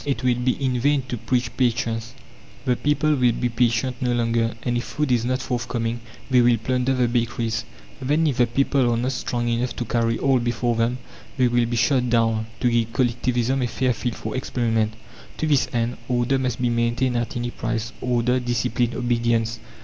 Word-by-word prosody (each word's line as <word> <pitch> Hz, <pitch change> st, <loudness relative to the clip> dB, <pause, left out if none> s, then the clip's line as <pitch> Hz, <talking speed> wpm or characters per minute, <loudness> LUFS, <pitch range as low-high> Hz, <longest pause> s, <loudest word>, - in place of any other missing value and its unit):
It 135 Hz, -4 st, -2 dB
will 125 Hz, -1 st, +4 dB
be 125 Hz, +1 st, +1 dB
in 130 Hz, -3 st, -1 dB
vain 140 Hz, +2 st, +2 dB
to -, -, -2 dB
preach 120 Hz, +2 st, -1 dB
patience. 115 Hz, -1 st, -1 dB, 0.5 s
The 125 Hz, -2 st, +2 dB
people 145 Hz, +3 st, +1 dB
will 125 Hz, -4 st, +3 dB
be 120 Hz, +1 st, -1 dB
patient 120 Hz, +1 st, +1 dB
no 125 Hz, -1 st, +1 dB
longer, 115 Hz, -1 st, +1 dB
and 120 Hz, -1 st, 0 dB
if 120 Hz, -, 0 dB
food 150 Hz, -3 st, -2 dB
is 120 Hz, -2 st, +2 dB
not 130 Hz, +1 st, -1 dB
forthcoming 120 Hz, -2 st, -2 dB, 0.3 s
they 125 Hz, -2 st, +4 dB
will 120 Hz, -1 st, +4 dB
plunder 125 Hz, +3 st, 0 dB
the 125 Hz, -1 st, +2 dB
bakeries. 115 Hz, -2 st, -1 dB, 0.4 s
Then, 150 Hz, +5 st, +2 dB
if 140 Hz, -5 st, 0 dB
the 120 Hz, -1 st, +4 dB
people 130 Hz, 0 st, +2 dB
are 115 Hz, -, +1 dB
not 125 Hz, +3 st, 0 dB
strong 120 Hz, -1 st, -2 dB
enough 120 Hz, +1 st, -1 dB
to 120 Hz, -, -3 dB
carry 115 Hz, 0 st, 0 dB
all 135 Hz, -2 st, +2 dB
before 120 Hz, 0 st, 0 dB
them, 115 Hz, +2 st, +1 dB, 0.4 s
they 130 Hz, -2 st, +4 dB
will 120 Hz, -1 st, +2 dB
be 120 Hz, -, -2 dB
shot 125 Hz, +1 st, +2 dB
down, 115 Hz, -2 st, +2 dB
to 120 Hz, -, +3 dB
give 115 Hz, -1 st, 0 dB
Collectivism 125 Hz, +1 st, +1 dB
a 125 Hz, -, +1 dB
fair 125 Hz, +2 st, 0 dB
field 120 Hz, +2 st, -3 dB
for 110 Hz, -, -5 dB
experiment. 115 Hz, -4 st, 0 dB, 0.4 s
To -, -, -1 dB
this 145 Hz, -4 st, +3 dB
end 120 Hz, 0 st, -1 dB
"order" 125 Hz, +2 st, +1 dB
must 125 Hz, -2 st, -2 dB
be 125 Hz, -1 st, +1 dB
maintained 120 Hz, +2 st, +1 dB
at 120 Hz, +3 st, -2 dB
any 120 Hz, 0 st, -2 dB
price 115 Hz, -1 st, -3 dB
order, 125 Hz, 0 st, +1 dB
discipline, 120 Hz, -1 st, 0 dB
obedience! 115 Hz, -1 st, 0 dB
120 Hz, 195 wpm, -23 LUFS, 115-125 Hz, 0.5 s, will